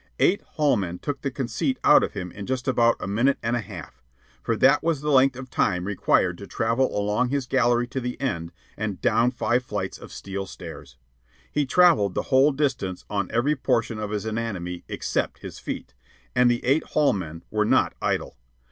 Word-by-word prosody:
Eight 200 - +3
hall 150 -5 +1
men 90 -3 -3
took 140 +6 -4
the 140 - -1
conceit 135 - -2
out - - +7
of - - -2
him 90 -1 -5
in 100 -1 -8
just 130 -1 -2
about 120 -2 +4
a - - -5
minute 115 +8 +2
and 120 +1 0
a - - 0
half 85 - -10 0.4
for 115 - 0
that 135 +5 +4
was 160 -4 0
the 150 0 -1
length 135 -1 +5
of 130 -1 -9
time 90 0 +1
required 100 -1 +1
to - - -9
travel 115 +1 0
along 105 +4 +1
his 140 -1 -1
gallery 120 -2 +2
to 130 - -3
the 125 0 -4
end 85 -12 -2 0.2
and 105 -3 -3
down 115 +3 +3
five 125 0 0
flights - - -4
of - - -11
steel 95 0 -5
stairs. 65 -7 -10 0.5
He 145 -2 0
travelled 155 - +4
the - - 0
whole 135 +3 +6
distance 130 -10 -2
on 100 -2 -1
every 135 +6 +1
portion 120 -5 0
of 105 -1 -3
his 105 0 -3
anatomy 105 -6 -4
except - - -2
his - - -8
feet, - - -6 0.4
and 125 0 +5
the 120 0 0
eight 140 +5 +3
hall 150 -2 +2
men 80 -4 -6
were 105 0 +2
not 105 - +2
idle. - - -1
120 Hz, 200 wpm, -25 LUFS, 100-135 Hz, 0.5 s, out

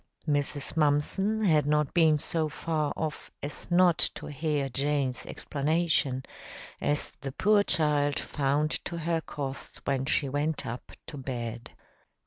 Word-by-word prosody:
Mrs. 145 0 -1
Mumpson 165 +8 +2
had 155 -7 +4
not 150 -1 +2
been 160 -3 +5
so 155 +1 -1
far 155 -2 -1
off 155 -1 -3
as 145 +5 -7
not 175 -1 +5 0.2
to - - -7
hear 150 -1 -1
Jane's 135 0 -1
explanation, 150 -3 0 0.6
as 145 0 0
the 135 -1 -4
poor 205 +8 +4
child 150 -6 +2
found 145 +2 0
to 170 - -4
her 165 0 0
cost 140 -3 -6
when 135 -1 0
she 145 -1 +2
went 145 +2 -1
up 120 +1 -6
to 155 -2 -8
bed. 120 -3 -5
150 Hz, 135 wpm, -29 LUFS, 140-160 Hz, 0.6 s, been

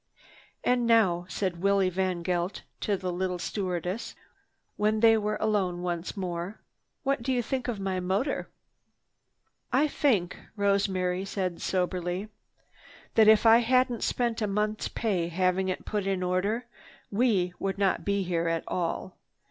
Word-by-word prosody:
"And 245 -1 +2
now," 185 -7 +3
said 185 -4 -2
Willie 200 -1 +3
VanGeldt 180 0 -1 0.2
to 205 -2 0
the 185 -1 -3
little 180 0 -2
stewardess 185 +3 -3 0.6
when 215 +1 +1
they 225 -1 +7
were 210 -1 0
alone 190 -5 0
once 175 +2 -3
more, 180 +1 -4 0.4
"what 275 -3 0
do 260 +3 -1
you 245 -2 +1
think 255 +2 -2
of 230 -5 -2
my 190 -1 -1
motor?" 195 +10 -1 1.2
"I 290 +4 +4
think," 225 - +1
said - - -16
Rosemary 195 -3 +1
soberly, 185 0 -2 0.8
"that 220 -1 +6
if 220 +1 +6
I 225 +1 +8
hadn't 250 0 +2
spent 235 -2 0
a 210 - +1
month's 210 +2 -1
pay 190 -7 -1
having 185 +2 +1
it 185 - -3
put 205 -2 -2
in 190 -2 0
order, 200 +6 0 0.5
we 200 -5 +2
would 195 0 -2
not 195 -1 +1
be 200 -1 0
here 170 -2 -1
at 165 -1 0
all. 180 +1 -3
195 Hz, 145 wpm, -28 LUFS, 180-220 Hz, 1.2 s, I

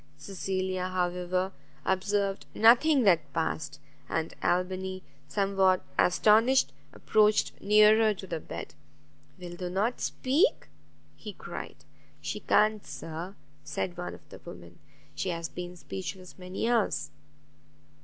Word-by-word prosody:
Cecilia, 185 +2 -3
however, 180 +1 -1 0.3
observed 195 +1 0
nothing 250 +5 +6
that 165 -8 +3
passed; 155 -2 -2 0.3
and 160 0 -2
Albany, 185 +1 -1 0.2
somewhat 195 -2 +2 0.2
astonished, 220 +8 +4 0.2
approached 215 0 +2
nearer 215 +1 +6
to 195 -2 -6
the 170 -3 -4
bed; - - -8 0.7
"Wilt 175 0 -8
thou 180 -1 -3
not 205 +7 -1
speak?" 295 - +1 0.5
he - - -8
cried. - - -8 0.3
"She - - -4
can't, 215 -1 +2
Sir," 165 +5 -7 0.3
said 150 +4 -3
one 175 0 -5
of - - -19
the - - -11
women; - - -12 0.3
"she 190 - -3
has 170 -1 -3
been 180 0 -7
speechless 185 +1 -7
many 185 +4 -3
hours." 235 -4 +1
190 Hz, 115 wpm, -29 LUFS, 180-210 Hz, 0.7 s, nothing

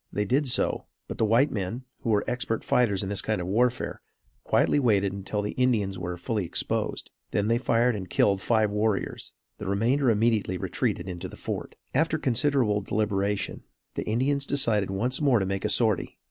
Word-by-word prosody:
They 105 - -1
did 135 +7 +1
so; 125 - 0 0.2
but - - -7
the 110 - +3
white 120 +7 +3
men, 110 +2 -3 0.2
who 115 - -4
were 105 -2 +3
expert 120 -1 -2
fighters 105 -6 +2
in 95 - -3
this 100 -2 0
kind - - -1
of 90 - -3
warfare, 120 +6 0 0.4
quietly - - +2
waited 100 -7 +2
until 100 +1 -3
the 105 - -2
Indians 110 -7 0
were 90 0 -4
fully 105 +4 -2
exposed. 85 - -2 0.2
They - - 0
then 115 +3 +2
fired 120 -1 +2
and 95 -3 -6
killed 100 -2 +2
five 110 -2 +2
warriors. 105 0 -1 0.3
The 105 - -5
remainder 120 +7 +2
immediately 110 -4 +1
retreated 95 +1 -2
into 90 -2 -5
the - - -11
fort. - - -5 0.2
After 160 +3 +2
considerable 125 -5 +1
deliberation, 100 -1 -1 0.3
the - - -3
Indians 140 +5 0
decided 110 -8 +2
once 120 +9 -1
more 140 -5 +4
to 95 - 0
make 95 +1 -2
a - - +1
sortie. 110 -3 +2
110 Hz, 185 wpm, -27 LUFS, 100-125 Hz, 0.4 s, more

